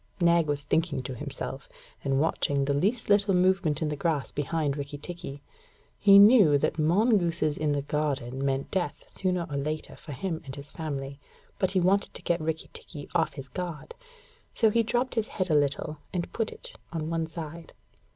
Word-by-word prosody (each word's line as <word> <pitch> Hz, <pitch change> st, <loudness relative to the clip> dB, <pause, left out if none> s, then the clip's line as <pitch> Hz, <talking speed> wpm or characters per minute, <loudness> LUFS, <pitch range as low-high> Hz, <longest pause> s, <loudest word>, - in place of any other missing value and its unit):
Nag 170 Hz, -2 st, +4 dB
was 145 Hz, -1 st, -1 dB
thinking 160 Hz, -2 st, 0 dB
to 130 Hz, -, -5 dB
himself, 125 Hz, -, -6 dB, 0.3 s
and 135 Hz, -1 st, +1 dB
watching 140 Hz, -2 st, +1 dB
the 140 Hz, -, +1 dB
least 205 Hz, -, +1 dB
little 205 Hz, -1 st, +4 dB
movement 180 Hz, -4 st, +2 dB
in 155 Hz, -, 0 dB
the 150 Hz, -, -2 dB
grass 150 Hz, -2 st, -1 dB
behind 145 Hz, 0 st, -1 dB
Rikki 145 Hz, 0 st, -5 dB
tikki. 145 Hz, -3 st, -8 dB, 0.6 s
He 200 Hz, -1 st, +8 dB
knew 200 Hz, -, +8 dB
that 140 Hz, -, -1 dB
mongooses 170 Hz, -3 st, +2 dB
in 150 Hz, -1 st, 0 dB
the 140 Hz, -1 st, -1 dB
garden 140 Hz, -3 st, -2 dB
meant 135 Hz, 0 st, -1 dB
death 185 Hz, -3 st, -2 dB
sooner 180 Hz, -2 st, -1 dB
or 145 Hz, -, -4 dB
later 155 Hz, +2 st, -3 dB
for 150 Hz, -, -9 dB
him 165 Hz, +4 st, -3 dB
and 135 Hz, -1 st, -8 dB
his 145 Hz, +1 st, -9 dB
family, 140 Hz, -3 st, -5 dB, 0.4 s
but 190 Hz, -, +2 dB
he 190 Hz, 0 st, +1 dB
wanted 190 Hz, +3 st, +2 dB
to -, -, -8 dB
get 170 Hz, -1 st, +1 dB
Rikki 160 Hz, 0 st, -3 dB
tikki 145 Hz, -4 st, -9 dB
off 165 Hz, -, +1 dB
his 135 Hz, -2 st, -8 dB
guard. 175 Hz, -, -6 dB, 0.6 s
So 220 Hz, -2 st, +4 dB
he 230 Hz, -, +3 dB
dropped 240 Hz, +3 st, 0 dB
his 225 Hz, -2 st, 0 dB
head 185 Hz, -3 st, -2 dB
a -, -, +4 dB
little, 145 Hz, +1 st, +1 dB
and 175 Hz, -2 st, -3 dB
put 225 Hz, -1 st, -1 dB
it -, -, -11 dB, 0.2 s
on 160 Hz, -1 st, -3 dB
one 165 Hz, -1 st, -1 dB
side. 165 Hz, 0 st, -8 dB
160 Hz, 190 wpm, -28 LUFS, 145-185 Hz, 0.6 s, He